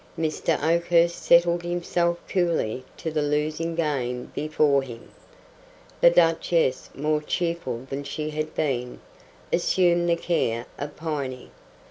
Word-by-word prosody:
Mr. 160 0 0
Oakhurst 170 +1 +2
settled 170 0 +4
himself 175 0 0
coolly 165 - 0
to 160 - -4
the 155 -1 0
losing 155 +3 -1
game 130 -6 -2
before 150 -2 +2
him. 120 -3 -10 0.9
The - - +8
Duchess, 165 -4 +2
more 150 +2 0
cheerful 150 -7 -2
than 135 +2 -4
she 150 +2 -4
had 155 0 -4
been, 125 -4 -2 0.5
assumed 175 0 +2
the 170 - +4
care 120 -9 -1
of 145 +1 -6
Piney. 140 -5 -4
155 Hz, 120 wpm, -25 LUFS, 140-170 Hz, 0.9 s, The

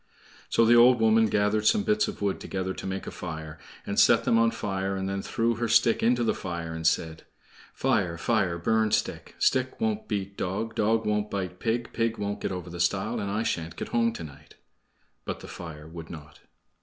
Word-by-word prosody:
So 115 - +4
the 115 - +6
old 120 +1 +7
woman 110 0 +4
gathered 105 +1 +1
some 205 - +4
bits 215 0 +2
of - - -6
wood 100 -2 0
together 95 -1 -3
to - - -7
make 95 0 -4
a - - -6
fire, 80 -3 -7 0.3
and - - -1
set - - +5
them 115 - +3
on 115 0 +4
fire, 95 -3 -3
and 95 0 -3
then 95 0 -2
threw 115 +2 0
her 120 0 -1
stick 115 +1 +4
into 120 +1 +3
the 115 - +2
fire 85 -3 -5
and 80 0 -1
said: 80 -1 0 0.5
"Fire, 85 -3 +1
fire, 95 -3 +1
burn 110 +5 +2
stick; - - -2
Stick 130 -1 +1
won't 220 -1 -1
beat 100 -1 -3
dog; 105 +5 -3
Dog 110 +1 +1
won't 105 0 0
bite 90 -2 -4
pig; 115 +1 -2
Pig 115 -1 0
won't 100 0 -3
get - - -2
over 90 -2 -6
the 85 - -7
stile, 100 +6 0
And 100 -1 -3
I 105 +3 -1
sha'n't 80 -5 -3
get - - -5
home 115 -1 +2
to 85 - -7
night." 75 0 -13 0.7
But - - -5
the - - -9
fire 75 -3 -9
would 80 0 -9
not. 75 -3 -11
100 Hz, 210 wpm, -27 LUFS, 85-115 Hz, 0.7 s, old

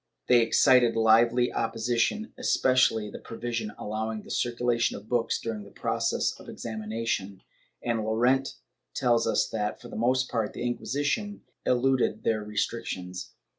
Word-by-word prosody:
They 120 -1 +5
excited 120 +1 +4
Hvely 115 +2 +4
opposition, 120 - 0
especially 130 - +2
the - - -8
provision 115 -2 -4
allowing 110 0 -4
the - - -10
circulation 120 -1 0
of 105 - -13
books 120 -1 0
during 110 -2 -4
the 100 - -13
process - - 0
of - - -13
exami 110 -2 -6
nation, 105 -4 -3 0.4
and 115 -2 0
Llorente 120 +5 +2 0.4
tells 120 -2 +2
us - - +2
that, 105 -1 -2
for 120 - -11
the - - -9
most 125 +3 +2
part, 110 -3 -2
the - - -7
Inquisi 125 +3 -2
tion 205 +7 -2 0.2
eluded 130 +1 +2
their 110 -1 +1
restrictions. 100 -4 -4
115 Hz, 145 wpm, -27 LUFS, 110-125 Hz, 0.4 s, They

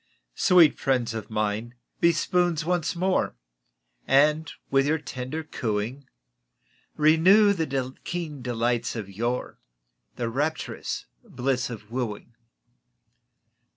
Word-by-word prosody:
Sweet 175 - +5
friends 125 -4 0
of 110 -1 -6
mine, 110 +2 -2 0.2
be 170 - +5
spoons 170 0 +1
once 175 -1 0
more, 185 - 0 0.7
And 150 +4 +3 0.2
with 135 0 +3
your 155 +2 +2
tender 140 +1 -5
cooing 120 0 -3 0.9
Renew 185 +7 +5
the 135 -7 -2
keen 160 -6 -4
delights 120 0 -1
of 110 -4 -4
yore 120 +5 -3 0.6
The 120 - -2
rapturous 145 +7 -3 0.2
bliss 125 -1 -1
of 110 -2 -9
wooing. 120 -2 -4
135 Hz, 105 wpm, -26 LUFS, 120-160 Hz, 0.9 s, Sweet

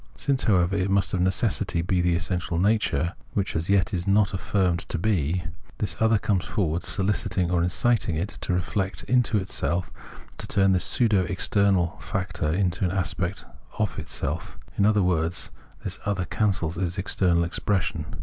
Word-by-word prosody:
Since, 140 -2 0
however, 95 -3 +3
it 95 -1 0
must 100 0 +1
of 90 - +1
necessity 95 -2 0
be 90 0 +1
this 85 -1 +1
essential 90 -2 -2
nature, 90 -4 +1 0.2
which 100 -1 -1
as 80 +2 -1
yet 100 +1 +2
it - - +1
is 85 +2 -4
not 100 0 +3
affirmed 95 -2 0
to - - -1
be, 90 -3 0 0.3
this 105 - +1
other 110 -1 +4
comes 100 -3 0
forward 90 -6 -1
soliciting 95 -2 -1
or 90 -1 +2
inciting 95 +1 +1
it 85 +6 -2
to - - -2
reflect 95 +2 -1
into 120 -5 +2
self, 85 0 -2 0.5
to - - -5
turn 95 -1 +3
this 90 -1 +2
pseudo 105 -6 +3
external 95 0 +1
factor 95 -5 -2
into 90 +1 0
an 90 - +2
aspect 95 0 -2 0.3
of 105 -5 -1
itself; 80 - -3 0.2
in 100 - +3
other 105 -2 +3
words, 85 -1 0 0.3
this - - -4
other 100 -3 -1
cancels 90 -5 -1
its 90 0 -1
external 90 -3 +2
expression. 85 -2 -1
95 Hz, 170 wpm, -25 LUFS, 85-100 Hz, 0.5 s, other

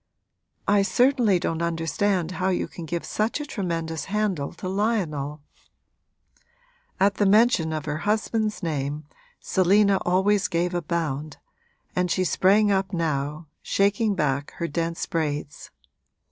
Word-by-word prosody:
'I 205 0 +4
certainly 240 -1 +3
don't 165 -2 -2
understand 170 +2 0
how 190 - +2
you 185 - 0
can 170 - -9
give 170 +1 -3
such 215 +6 -1
a 295 - -4
tremendous 165 - -3
handle 195 -8 -1
to - - -7
Lionel.' 175 -8 -1 1.6
At 200 +1 +3
the 205 - +3
mention 210 -6 +4
of 155 -2 -3
her 150 0 -2
husband's 215 +2 -1
name 150 -2 -2 0.4
Selina 195 +2 +3
always 190 +3 +2
gave 175 +1 -1
a 175 - 0
bound, 155 -3 -3 0.6
and 180 0 +1
she 185 - +1
sprang 200 +4 +3
up 190 -1 0
now, 155 -2 -2 0.2
shaking 205 +1 +1
back 140 -4 -1
her 170 - -2
dense 165 +1 -2
braids. 150 -2 -3
180 Hz, 130 wpm, -25 LUFS, 160-205 Hz, 1.6 s, I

